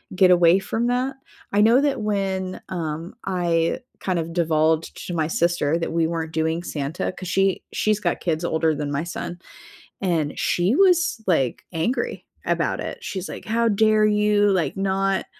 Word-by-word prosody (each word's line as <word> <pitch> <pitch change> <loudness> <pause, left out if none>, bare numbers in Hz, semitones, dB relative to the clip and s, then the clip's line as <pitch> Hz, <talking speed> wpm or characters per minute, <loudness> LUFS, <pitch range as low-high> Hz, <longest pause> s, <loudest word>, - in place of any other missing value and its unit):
get 185 -1 +5
away 175 +1 +5
from 225 +4 -2
that. 255 +2 0 0.4
I 205 - +4
know 230 +5 +5
that 280 -4 0
when, 195 -3 -2
um, 165 +3 -4
I, 170 -3 0 0.2
kind 185 -2 -1
of 165 0 -4
divulged 160 -1 +1
to 175 - -4
my 160 -2 0
sister 165 -2 +1
that 165 -1 -3
we 165 -1 +2
weren't 165 -1 -3
doing 160 +1 0
Santa 150 0 -3
'cause 185 0 -9
she 195 0 +1
she's 215 -1 +1
got 175 -5 -1
kids 165 -1 -1
older 160 -1 +1
than 145 -1 -3
my 145 +3 -1
son, 175 0 -6 0.6
and 165 -6 -1
she 180 +9 +1
was, 360 - +3
like, 135 -9 +1
angry 245 - -2 0.2
about - - 0
it, - - -6
she's 190 -1 -4
like, - - -8
"How 230 +1 +2
dare 215 0 +4
you, 210 0 +3
like, 185 -2 0
not 195 0 0
180 Hz, 170 wpm, -23 LUFS, 165-210 Hz, 0.6 s, get